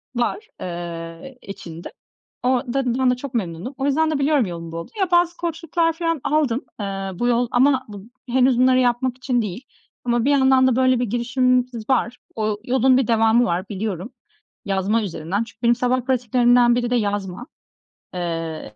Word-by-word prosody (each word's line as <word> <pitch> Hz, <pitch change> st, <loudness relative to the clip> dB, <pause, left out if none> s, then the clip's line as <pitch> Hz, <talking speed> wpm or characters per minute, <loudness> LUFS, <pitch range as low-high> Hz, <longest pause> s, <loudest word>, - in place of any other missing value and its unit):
var, 245 Hz, -, -1 dB
eee, 170 Hz, +6 st, -7 dB
içinde. 170 Hz, -4 st, -9 dB, 0.5 s
O 250 Hz, -, +2 dB, 0.2 s
da 270 Hz, +2 st, -1 dB
ben 255 Hz, -1 st, +4 dB
de -, -, +1 dB
çok 265 Hz, +1 st, -8 dB
memnunum, 190 Hz, -, -3 dB
o 270 Hz, -, -2 dB
yüzden 315 Hz, +3 st, +2 dB
de 300 Hz, -, -1 dB
biliyorum 280 Hz, -3 st, +2 dB
yolum 170 Hz, -2 st, -7 dB
bu 165 Hz, -, -6 dB
olduğunu. 370 Hz, -, -3 dB
Bazı 345 Hz, 0 st, +3 dB
koçluklar 330 Hz, 0 st, -1 dB
falan 330 Hz, -3 st, -2 dB
aldım, 280 Hz, -4 st, +1 dB, 0.2 s
eee, 205 Hz, -, -2 dB, 0.3 s
bu 240 Hz, +7 st, -1 dB
yol 245 Hz, 0 st, +2 dB
ama 260 Hz, +1 st, +3 dB
bu 200 Hz, -2 st, -9 dB, 0.3 s
henüz 255 Hz, 0 st, +3 dB
bunları 255 Hz, 0 st, +5 dB
yapmak 250 Hz, 0 st, +1 dB
için 250 Hz, -1 st, 0 dB
değil 210 Hz, +3 st, -5 dB, 0.4 s
ama 240 Hz, -1 st, +1 dB
bir 285 Hz, -, +3 dB
yandan 265 Hz, -1 st, +4 dB
da 255 Hz, -, +2 dB
böyle 255 Hz, -1 st, +3 dB
bir 245 Hz, -, +1 dB
girişimimiz 245 Hz, 0 st, 0 dB
var. 250 Hz, -1 st, +1 dB, 0.2 s
O 215 Hz, -1 st, -1 dB
yolun 255 Hz, +1 st, +3 dB
bir 260 Hz, -4 st, +1 dB
devamı 225 Hz, +1 st, +4 dB
var 185 Hz, 0 st, -2 dB
biliyorum 205 Hz, +2 st, -4 dB, 0.5 s
yazma 200 Hz, +3 st, 0 dB
üzerinden, 185 Hz, +2 st, -2 dB
çünkü -, -, -18 dB
benim 235 Hz, 0 st, +4 dB
sabah 250 Hz, +1 st, +1 dB
pratiklerimden 245 Hz, -1 st, +3 dB
biri 240 Hz, 0 st, -1 dB
de 245 Hz, -, +1 dB
yazma, 205 Hz, +1 st, -2 dB, 0.7 s
eee, 165 Hz, -8 st, -4 dB
245 Hz, 175 wpm, -22 LUFS, 205-260 Hz, 0.7 s, bunları